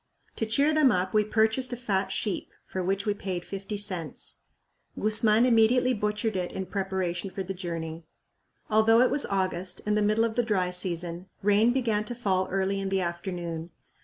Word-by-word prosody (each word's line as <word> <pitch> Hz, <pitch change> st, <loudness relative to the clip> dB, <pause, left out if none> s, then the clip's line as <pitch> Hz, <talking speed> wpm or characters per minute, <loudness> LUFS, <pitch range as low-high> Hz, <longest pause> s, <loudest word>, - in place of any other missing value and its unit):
To 225 Hz, -, -1 dB
cheer 280 Hz, +8 st, +2 dB
them 305 Hz, -4 st, +5 dB
up 180 Hz, +1 st, 0 dB
we 215 Hz, 0 st, +4 dB
purchased 220 Hz, +4 st, +1 dB
a -, -, -4 dB
fat 200 Hz, -5 st, -1 dB
sheep, 205 Hz, -5 st, -2 dB, 0.2 s
for 185 Hz, -, -4 dB
which 195 Hz, +2 st, -1 dB
we 210 Hz, -, +1 dB
paid 185 Hz, -3 st, -4 dB
fifty 195 Hz, +1 st, -5 dB
cents. 185 Hz, -7 st, -3 dB, 0.6 s
Guzman 215 Hz, +2 st, +4 dB
immediately 250 Hz, +2 st, +4 dB
butchered 210 Hz, 0 st, -1 dB
it 180 Hz, -1 st, -2 dB
in 190 Hz, -, -4 dB
preparation 190 Hz, -1 st, -2 dB
for 190 Hz, +1 st, -5 dB
the 190 Hz, +1 st, -4 dB
journey. 165 Hz, -3 st, -5 dB, 0.6 s
Although 220 Hz, +2 st, +5 dB
it 255 Hz, -, +4 dB
was 285 Hz, -, 0 dB
August 185 Hz, -1 st, -2 dB
and 210 Hz, 0 st, +1 dB
the 210 Hz, -, +2 dB
middle 215 Hz, +2 st, +3 dB
of 225 Hz, -, -2 dB
the 245 Hz, -, +2 dB
dry 195 Hz, -6 st, 0 dB
season, 175 Hz, 0 st, -2 dB, 0.2 s
rain 210 Hz, +3 st, +4 dB
began 230 Hz, -5 st, 0 dB
to 240 Hz, -, -5 dB
fall 190 Hz, -5 st, 0 dB
early 195 Hz, +1 st, 0 dB
in 195 Hz, 0 st, -2 dB
the 195 Hz, 0 st, +1 dB
afternoon. 170 Hz, -1 st, -4 dB
200 Hz, 185 wpm, -27 LUFS, 185-220 Hz, 0.6 s, them